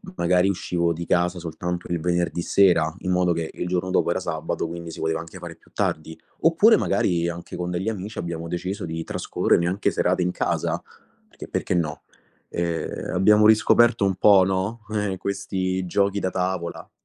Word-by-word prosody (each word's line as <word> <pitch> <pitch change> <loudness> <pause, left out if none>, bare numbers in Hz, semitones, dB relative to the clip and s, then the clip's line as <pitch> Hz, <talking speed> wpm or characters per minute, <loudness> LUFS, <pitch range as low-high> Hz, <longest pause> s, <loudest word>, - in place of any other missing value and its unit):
magari 90 +2 +2
uscivo 85 -2 0
di 85 +1 -4
casa 90 +1 +1
soltanto 90 +1 -4
il 85 - 0
venerdì 85 0 0
sera, 85 -4 +3
in 95 - -2
modo 90 -1 +2
che 85 -1 -3
il 90 - -4
giorno 90 +1 -1
dopo 95 - +2
era - - 0
sabato, - - -3
quindi 85 0 -7
si - - -9
poteva 80 0 -1
anche 85 +3 -9
fare 85 -1 -8
più - - -26
tardi. 80 +1 -2 0.2
Oppure 170 +8 +5
magari, 85 -3 +1
anche 85 0 -7
con 90 0 -3
degli 90 +4 -2
amici, 105 0 -6
abbiamo 85 -1 -4
deciso 90 +4 -4
di 80 0 -4
trascorrere 85 - 0
anche 95 +3 0
serate 90 - +1
in 90 - 0
casa, - - -1 0.5
perchè - - -11
perché - - -2
no. 80 -4 -1 0.5
E, - - -3 0.3
ehm, - - -5
abbiamo 105 +3 +5
riscoperto 110 +1 +5
un 95 -1 +2
po' 95 -1 +6
no, 95 +4 -1 0.2
eh, 100 -2 -1
questi 95 -1 -2
giochi 100 +3 +1
da 95 - -2
tavola. 90 -2 -3
90 Hz, 185 wpm, -24 LUFS, 85-95 Hz, 0.5 s, po